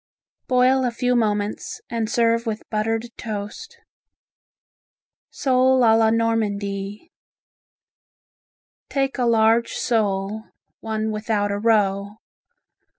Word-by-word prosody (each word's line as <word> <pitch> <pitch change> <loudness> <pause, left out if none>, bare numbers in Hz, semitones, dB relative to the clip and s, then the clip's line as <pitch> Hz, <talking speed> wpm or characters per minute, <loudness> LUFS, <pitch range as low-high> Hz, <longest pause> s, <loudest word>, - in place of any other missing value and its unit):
Boil 255 +1 +3
a 250 - +1
few 245 +1 0
moments 210 -2 -1
and 225 -2 -2
serve 230 0 +1
with 220 -1 -4
buttered 225 +2 -2
toast. 220 - -6 1.5
Sole 260 -1 +2
a 225 -1 +6
la 225 0 +4
Normandie 210 +1 -2 1.8
Take 270 -1 -1
a 245 - +2
large 230 0 +3
sole 210 -1 -1 0.3
(one 220 0 -3
without 210 -1 -1
a 200 - -2
roe). 205 -2 +1
225 Hz, 95 wpm, -22 LUFS, 210-235 Hz, 1.8 s, a